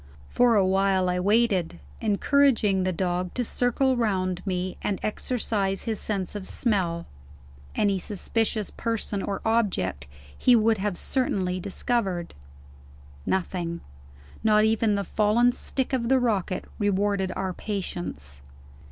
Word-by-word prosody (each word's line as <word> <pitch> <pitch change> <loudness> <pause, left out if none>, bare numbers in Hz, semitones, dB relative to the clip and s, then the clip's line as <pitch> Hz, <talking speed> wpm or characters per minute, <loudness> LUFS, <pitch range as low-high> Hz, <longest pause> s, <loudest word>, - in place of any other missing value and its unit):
For 245 -2 +4
a 200 -2 +4
while 190 0 +2
I 180 0 0
waited, 200 - +2 0.2
encouraging 215 -2 +3
the 185 0 +1
dog 180 0 -2
to 245 - 0
circle 255 +3 +1
round 185 -6 0
me 185 0 -2
and 200 - -1
exercise 210 -3 -1
his 225 -3 -2
sense 195 -4 -3
of 205 -2 -6
smell. 180 -8 0 0.7
Any 200 -2 +2
suspicious 215 +2 -1
person 225 -3 -2
or 200 0 -3
object 180 - 0 0.3
he 250 - +5
would 225 -1 +3
have 200 -2 -1
certainly 185 -8 -1
discovered. 195 -2 -2 0.9
Nothing 175 -2 -1 0.6
not 215 -1 +5
even 220 -1 +2
the 200 - -1
fallen 215 +5 +3
stick 265 +2 -3
of 240 -2 0
the 265 - +5
rocket 205 -7 -1
rewarded 200 -2 +1
our 190 -1 -2
patience. 175 - -5
200 Hz, 125 wpm, -26 LUFS, 185-225 Hz, 0.9 s, he